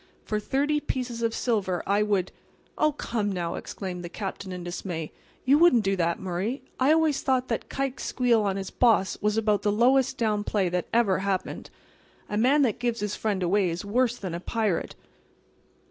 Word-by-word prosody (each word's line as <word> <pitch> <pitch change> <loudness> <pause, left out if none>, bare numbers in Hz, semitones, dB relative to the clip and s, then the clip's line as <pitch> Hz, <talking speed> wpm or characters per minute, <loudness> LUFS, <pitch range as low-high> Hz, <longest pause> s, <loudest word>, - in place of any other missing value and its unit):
For 215 - -1
thirty 285 +7 0
pieces 250 -5 -3
of 230 -1 +1
silver 205 -7 -1
I 200 +1 +2
would"— 200 -3 +1 0.4
"Oh, 305 0 +3
come 225 -7 -2
now!" 175 -3 -2
exclaimed 180 -3 -6
the 175 - -6
Captain 195 0 -5
in 180 -1 -6
dismay. 175 -2 -5 0.3
"You 280 +3 +5
wouldn't 285 -10 +6
do 195 0 +1
that, 170 -2 0
Murray! 190 +8 -3 0.2
I 265 +3 +4
always 315 -3 +3
thought 260 -1 +1
that 230 - -2
Kike's 270 -1 -3
squeal 245 -3 +2
on 200 -2 0
his 195 -1 -5
boss 225 -6 +2
was 210 +1 +1
about 210 -2 +2
the 205 - +1
lowest 250 +5 +3
down 210 -3 0
play 200 -4 0
that 180 0 -2
ever 220 -6 +3
happened. 195 -1 -3 0.6
A 210 - -2
man 265 +7 +4
that 235 -4 0
gives 240 -2 -1
his 210 -1 -2
friend 200 -4 -1
away 185 +1 +2
is 170 +3 -4
worse 245 +3 +1
than 185 -4 -5
a 170 - -3
pirate." 210 -2 -1
210 Hz, 190 wpm, -26 LUFS, 190-245 Hz, 0.6 s, wouldn't